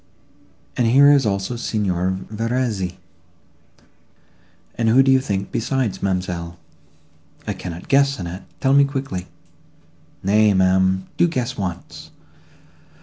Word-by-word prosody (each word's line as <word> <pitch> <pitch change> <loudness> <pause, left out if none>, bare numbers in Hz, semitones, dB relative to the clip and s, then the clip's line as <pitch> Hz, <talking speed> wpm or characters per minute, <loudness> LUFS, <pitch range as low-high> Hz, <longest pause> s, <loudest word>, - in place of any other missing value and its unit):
—And 120 - +2
here 140 +5 +6
is 140 -5 +3
also 100 +3 -2
Signor 95 -5 -1
Verezzi, 110 -5 -2 1.8
and 115 -1 0
who 130 +4 +5
do 135 - +3
you 130 - +5
think 100 -6 -3
besides, 120 -2 -2
ma'amselle?" 90 -3 -3 0.9
"I - - -2
cannot 90 -1 -8
guess, 140 0 +3
Annette; 90 +1 -7 0.2
tell 135 0 +3
me 140 0 +6
quickly." 135 -10 -4 1.0
"Nay, 105 +1 +3
ma'am, 95 0 +2
do 175 - +4
guess 130 -6 -3
once." 90 -4 -6
105 Hz, 115 wpm, -21 LUFS, 95-130 Hz, 1.8 s, here